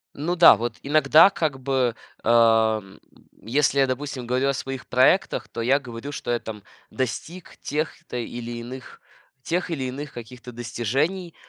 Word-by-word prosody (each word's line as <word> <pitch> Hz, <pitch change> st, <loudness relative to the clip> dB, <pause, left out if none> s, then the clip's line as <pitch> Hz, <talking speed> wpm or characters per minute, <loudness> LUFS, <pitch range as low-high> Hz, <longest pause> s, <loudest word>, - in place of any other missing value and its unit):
Ну 170 Hz, +5 st, -2 dB
да, 170 Hz, -, +8 dB
вот 115 Hz, -1 st, -4 dB
иногда, 155 Hz, +4 st, +6 dB
как 155 Hz, -8 st, -2 dB
бы, 130 Hz, -3 st, 0 dB, 0.3 s
эм, 110 Hz, -3 st, +3 dB, 0.4 s
если 140 Hz, +4 st, +1 dB
я, 135 Hz, -, +4 dB
допустим, 130 Hz, -1 st, -4 dB
говорю 130 Hz, +3 st, +1 dB
о -, -, +1 dB
своих 135 Hz, 0 st, -6 dB
проектах, 130 Hz, +10 st, +2 dB
то 115 Hz, -, -5 dB
я 135 Hz, +5 st, +3 dB
говорю, 125 Hz, +2 st, -8 dB
что 120 Hz, -, -4 dB
я 120 Hz, -, +1 dB
там 105 Hz, -3 st, -8 dB, 0.3 s
достиг 145 Hz, +8 st, -5 dB
тех-то 150 Hz, -4 st, -4 dB
или 120 Hz, 0 st, -5 dB
иных, 125 Hz, +2 st, -9 dB, 0.4 s
тех 175 Hz, +2 st, -1 dB
или 145 Hz, -6 st, -3 dB
иных 140 Hz, +3 st, -6 dB
каких-то 125 Hz, +1 st, -10 dB
достижений. 135 Hz, -, -2 dB
130 Hz, 150 wpm, -24 LUFS, 120-145 Hz, 0.4 s, да